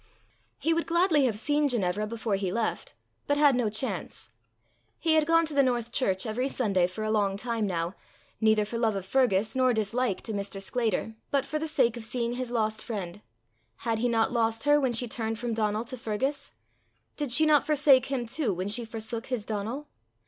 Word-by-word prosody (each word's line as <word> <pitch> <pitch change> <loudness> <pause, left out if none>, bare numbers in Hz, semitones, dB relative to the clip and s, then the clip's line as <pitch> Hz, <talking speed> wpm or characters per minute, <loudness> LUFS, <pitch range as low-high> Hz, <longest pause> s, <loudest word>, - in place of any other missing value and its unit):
He 330 - +1
would 335 0 -1
gladly 335 -4 +3
have 225 -5 0
seen 295 +5 +1
Ginevra 210 -4 0
before 225 -1 -3
he 195 -2 -1
left, 225 +2 -2 0.3
but 285 - +2
had 290 -2 +5
no 245 -3 +1
chance. 215 +5 -4 0.7
He 325 -1 +2
had 310 -1 +3
gone 330 0 +4
to 310 - -5
the 280 - +4
North 240 -3 0
church 190 -7 0
every 240 +4 -1
Sunday 200 -10 +1
for 200 +4 -6
a 215 - -1
long 200 -2 +1
time 225 -1 -1
now, 170 -1 -2 0.5
neither 220 -1 +3
for 230 +2 -4
love 225 -3 +1
of 195 -2 -4
Fergus, 215 -2 +1
nor 255 -2 +3
dislike 220 0 0
to 220 - -5
Mr. 200 -1 -3
Sclater, 225 +1 -1 0.2
but 275 -1 +1
for 305 +2 -3
the 320 - -3
sake 240 -6 +2
of 235 - -7
seeing 235 +1 -2
his 250 0 -4
lost 220 -2 -1
friend: 205 -3 -5 0.6
had 225 -1 0
he 245 +2 +1
not 225 -1 +2
lost 225 -1 0
her 290 0 +4
when 265 -3 +1
she 240 +1 +1
turned 225 -1 -3
from 235 0 -3
Donal 215 0 0
to 255 +2 -6
Fergus? 245 +6 -3 0.6
Did 290 -4 -3
she 310 +6 +5
not 300 -2 +4
forsake 280 -4 +4
him 265 -3 -2
too 260 0 0
when 185 +3 -3
she 235 +3 +2
forsook 225 +1 -4
his 245 -5 -3
Donal? 225 +8 -4
230 Hz, 205 wpm, -28 LUFS, 215-265 Hz, 0.7 s, had